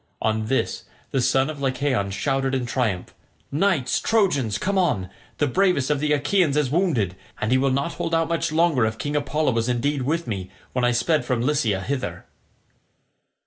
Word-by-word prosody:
On 110 0 0
this 135 - -1 0.3
the 135 - +1
son 135 +2 +2
of 150 -2 -6
Lycaon 130 -6 0
shouted 135 +5 0
in 130 -2 -1
triumph, 120 -7 -2 0.4
"Knights 155 -3 +1
Trojans, 145 - +1
come 195 - -1
on; 130 - +1 0.3
the 145 - +2
bravest 165 -2 +2
of 145 - +1
the 150 +1 0
Achaeans 150 +1 +2
is 145 -4 +1
wounded, 145 - +1 0.2
and 110 - -1
he 130 - +4
will 135 +1 +2
not 140 +5 -1
hold 165 - -2
out 165 -1 +2
much 165 -2 -1
longer 160 -6 +3
if 110 0 -4
King 145 +4 -3
Apollo 150 0 +1
was 115 +1 0
indeed 135 +4 0
with 160 +6 -1
me 95 -5 -4 0.2
when 125 - 0
I 120 - +4
sped 155 +6 +1
from 125 -3 -1
Lycia 120 -8 +1
hither." 130 +6 -4
135 Hz, 185 wpm, -23 LUFS, 120-155 Hz, 0.4 s, he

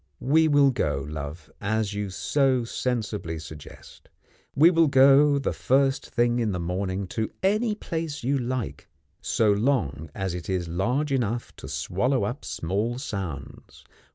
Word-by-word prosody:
We 160 +4 +3
will 145 -2 +5
go, 70 - -1
love 75 +1 -7
as 110 0 -1
you 105 -1 -3
so 130 +5 +1
sensibly 110 -8 -3
suggest 80 -1 -12 0.5
we 160 +5 +7
will 165 -2 +4
go 140 +1 +6
the 140 - -1
first 135 +1 +1
thing 120 0 +1
in 110 -4 0
the 90 - -2
morning 95 +3 -2
to 110 +2 -2
any 210 +3 +2
place 160 - -4
you 135 +3 +1
like, 120 - -4 0.3
so 110 -2 +2
long 100 - 0
as 95 -2 -2
it 90 -1 -6
is 90 -2 -1
large 125 - -1
enough 120 -3 -1
to - - -9
swallow 95 - 0
up 120 +8 -3
small 105 +8 -2
sounds. 95 - -7
115 Hz, 150 wpm, -26 LUFS, 90-135 Hz, 0.5 s, we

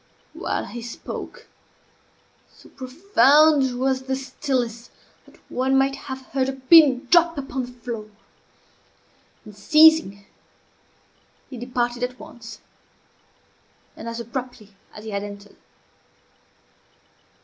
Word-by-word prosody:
While - - -3
he 240 - -8
spoke, 235 0 -8 1.0
so - - -19
profound 280 - +3
was 260 0 0
the 265 0 -3
stillness 255 -3 -3 0.4
that - - -20
one 265 +1 0
might 270 0 +2
have 265 -1 -8
heard 265 -1 0
a - - -3
pin 270 0 +5
drop 340 -2 +4
upon 265 -2 -4
the - - -12
floor. 235 -3 -7 1.4
In 210 - -12
ceasing, 300 -3 +4 1.3
he 255 - -7
departed 245 0 -2
at 250 0 -4
once, 225 -3 -12 1.3
and 230 - -7
as 230 0 -6
abruptly 235 -3 -7 0.2
as 210 - -12
he 220 - -7
had 200 0 -2
entered. 205 0 -10
255 Hz, 110 wpm, -23 LUFS, 235-270 Hz, 1.4 s, pin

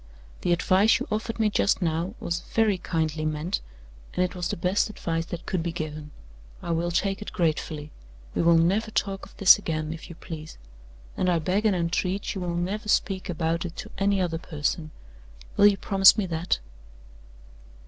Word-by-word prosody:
The 175 - 0
advice 190 +6 +4
you 260 - -4
offered 220 +2 -2
me 215 -1 +2
just 200 - +2
now 170 +3 -1
was 170 0 -2 0.2
very 215 -4 +3
kindly 160 -3 -1
meant, 155 +4 -2 0.5
and 180 - +3
it 180 - -5
was 175 -2 -3
the - - -3
best 185 +5 +1
advice 165 -5 -3
that 175 -1 -6
could 185 - -1
be 170 +1 -2
given. 155 -2 -5 0.5
I 170 - -4
will 170 +1 0
take 195 +3 0
it 210 - -6
gratefully. 155 -2 -1 0.4
We - - 0
will 170 0 +5
never 195 +7 +2
talk 195 -2 -2
of - - -20
this 195 +1 +8
again, 155 -4 -3
if 165 +2 -10
you 170 - -9
please; 160 -2 -8 0.6
and 185 - +1
I 175 - +3
beg 185 +7 +1
and 200 - +2
entreat 180 +3 -1
you 195 - -5
will 175 -1 -2
never 205 +5 -2
speak 190 -2 +1
about 165 -1 -1
it 175 -1 -6
to - - -8
any 200 0 +2
other 170 -3 -1
person. 155 0 -2 0.7
Will 205 - +7
you 200 -1 +3
promise 195 0 +6
me 210 - +1
that?" 170 -1 -1
175 Hz, 190 wpm, -26 LUFS, 165-195 Hz, 0.7 s, this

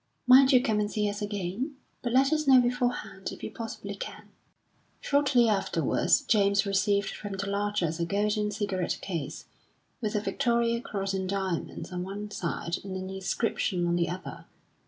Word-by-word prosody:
"Mind 260 +2 +8
you 250 -2 +5
come 215 -2 +1
and 205 0 0
see 210 -2 0
us 205 +1 -3
again. 205 - -3 0.3
But 240 - -2
let 270 +4 +4
us 305 -1 0
know 265 -1 +8
beforehand, 245 -5 -1
if - - -10
you - - -4
possibly 225 -3 -6
can." 200 - -8 0.7
Shortly 280 -4 +3
afterwards 205 -3 +2
James 200 -2 +3
received 200 +1 +1
from 205 -1 -6
the 195 +1 -3
Larchers 200 -5 -1
a 170 - +1
golden 210 +2 +1
cigarette 200 -3 -2
case, 165 -7 -4 0.6
with 215 -1 -2
a - - +3
Victoria 235 0 +1
Cross 195 -4 -3
in 190 -1 -2
diamonds 190 -2 -3
on 180 - -3
one 205 +3 -6
side 170 -2 -2
and 195 -1 -6
an 185 0 -5
inscription 190 -1 -1
on 170 0 +1
the 170 -1 +1
other. 180 +2 -7
205 Hz, 170 wpm, -28 LUFS, 190-235 Hz, 0.7 s, Mind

